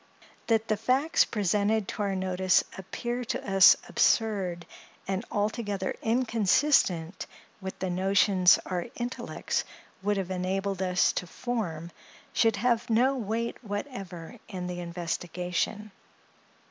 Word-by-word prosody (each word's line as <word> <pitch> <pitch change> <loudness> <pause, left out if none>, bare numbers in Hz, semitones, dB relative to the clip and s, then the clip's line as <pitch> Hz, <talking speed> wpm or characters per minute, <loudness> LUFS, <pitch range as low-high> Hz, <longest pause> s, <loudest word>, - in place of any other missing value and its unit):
That 225 -1 +2
the 215 - +1
facts 260 +9 +2
presented 210 0 +1
to - - -4
our 200 -1 0
notice 185 -1 +2
appear 240 +6 -4
to - - -4
us 195 -1 +9
absurd, 195 -6 +1 0.4
and 190 +2 -1
altogether 205 -3 -2
inconsistent 225 - +2 0.3
with 190 0 -6
the 185 -1 -2
notions 190 0 +4
our 180 +1 -3
intellects 240 +1 -3 0.4
would 205 +1 0
have 190 -1 -3
enabled 190 +1 -2
us 180 -1 +2
to 180 - -3
form, 175 -8 -4 0.4
should 225 -2 +3
have 235 +3 +1
no 250 +5 +3
weight 230 +1 -3
whatever 205 - -6
in 185 -3 -5
the 180 0 -4
investigation. 175 +4 -3
200 Hz, 120 wpm, -28 LUFS, 180-225 Hz, 0.4 s, us